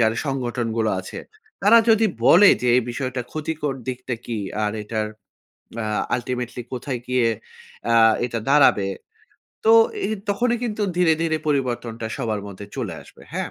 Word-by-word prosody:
যারা 110 0 +3
সংগঠনগুলো 120 -4 -1
আছে, 95 - -8 0.4
তারা 225 +4 +7
যদি 220 0 +5 0.2
বলে 205 +4 +8
যে 125 - +1
এই 125 - +3
বিষয়টা 130 0 -3
ক্ষতিকর 155 -2 -3
দিকটা 125 -1 -3
কি 115 -2 -4 0.3
আর 105 - -1
এটার 110 0 -2 0.8
আ - - -3 0.3
আল্টিমেটলি 125 0 -4
কোথায় 125 0 -4
গিয়ে 125 -2 +2 0.7
আ - - +5 0.3
এটা 120 -2 -3
দাঁড়াবে? 135 -9 +5 0.8
তো 225 - +6 0.3
এ - - -3 0.2
তখনই 240 +4 +1
কিন্তু 215 -2 -2
ধীরে, 175 -3 +4
ধীরে 160 -1 +1
পরিবর্তনটা 120 -5 -2
সবার 110 -6 -2
মধ্যে 100 0 -9
চলে - - -3
আসবে। - - -18
হ্যাঁ? - - -3
125 Hz, 145 wpm, -22 LUFS, 115-155 Hz, 0.8 s, বলে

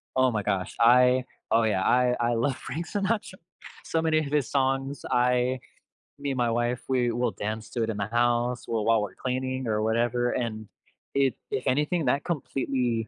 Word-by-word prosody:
oh 130 -1 +4
my 105 -3 -1
gosh, 95 -1 -2
I 125 +2 +5 0.3
oh, 115 +1 +4
yeah, 100 -4 +1
I 125 0 +3
I 120 0 +1
love 125 +3 0
Frank 160 +8 -5
Sinatra. 205 -1 -1 0.5
So 165 - -1
many 160 -1 +2
of 155 - -2
his 145 -5 +1
songs, 135 0 0
I 125 +1 +2 0.6
me 140 -1 -2
and 130 - -3
my 120 -1 +1
wife, 120 +1 0
we 125 -2 +1
will 120 +2 0
dance 110 +1 -5
to 120 - -2
it 110 - -2
in 105 - -3
the 100 - -1
house, 120 +1 0
we'll 110 -2 -1
while 115 -1 +4
we're 105 - -5
cleaning 130 0 -3
or 105 -1 0
whatever, 120 +2 +1
and 110 -3 -3 0.5
it 135 -3 +3 0.2
if 130 - -2
anything, 150 +4 +1
that 140 +3 +1
completely 130 - -1
125 Hz, 190 wpm, -27 LUFS, 115-135 Hz, 0.6 s, I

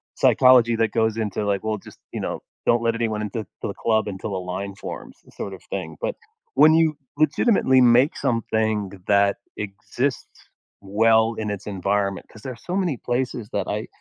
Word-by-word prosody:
psychology 125 -2 +5
that 110 -1 +1
goes 110 -1 +1
into, 105 -1 -2
like, 100 -1 0
well 110 -1 -1
just, - - -14
you - - -3
know, - - -3 0.2
"Don't 120 0 +3
let 115 0 +1
anyone 110 -2 -1
into 105 +1 -3
into 110 - -5 0.2
the 100 - -4
club 110 0 +1
until 100 0 -4
a - - -1
line 95 +2 -5
forms" - - -8 0.2
sort - - -5
of - - -10
thing. - - -5
But - - -2 0.4
when 155 - +7
you 160 -2 +3 0.2
legitimately 155 - +3
make 125 +4 +5
something 110 -4 0 0.2
that 100 0 +3 0.2
exists 105 +7 -3 0.6
well 110 +3 +3
in 105 -1 -3
its 100 0 -6
environment 100 0 -1
'cause 110 - -14
there 130 +3 -5
are - - -12
so 175 +10 -5
many 180 -7 0
places 120 -2 -2
that 100 -2 -1
I 105 +2 -3
110 Hz, 185 wpm, -23 LUFS, 100-125 Hz, 0.6 s, when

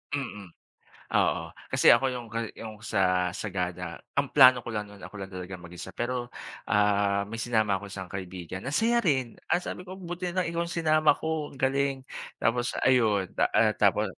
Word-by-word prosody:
Mm 105 -8 -5 0.6
oo. - - +2 0.3
Kasi - - +6
ako 135 - +6
yung 120 -2 -6
gani 115 -1 -4
yung 110 -1 -8
sa 90 -5 +1
Sagada 90 -4 -4 0.2
ang 140 -1 0
plano 130 -2 +7
ko 120 - -8
lang 105 -2 -3
nun 105 -1 -14
ako - - -10
lang 100 - -5
talaga 90 0 -6
mag-isa 85 0 -9
pero, 120 0 -3 0.4
ah, 100 -1 +2
may 115 +2 -6
sinama 110 -5 +1
ako 100 - -8
isang 95 -1 -6
kaibigan. 95 -1 -6
Ang 140 +7 -3
saya 235 +1 +3
rin, 130 - +1 0.2
ah, - - +4
sabi 180 - -5
ko 190 - -7
buti 175 0 -4
na 185 0 0
lang 170 - -3
ikaw 170 0 -1
sinama 155 -3 +3
ko 160 -2 -2
galing 135 0 0 0.3
tapos 120 +2 0
ayun, 110 -7 +4 0.2
ah, - - +4
tapos - - +3
115 Hz, 180 wpm, -28 LUFS, 100-140 Hz, 0.6 s, plano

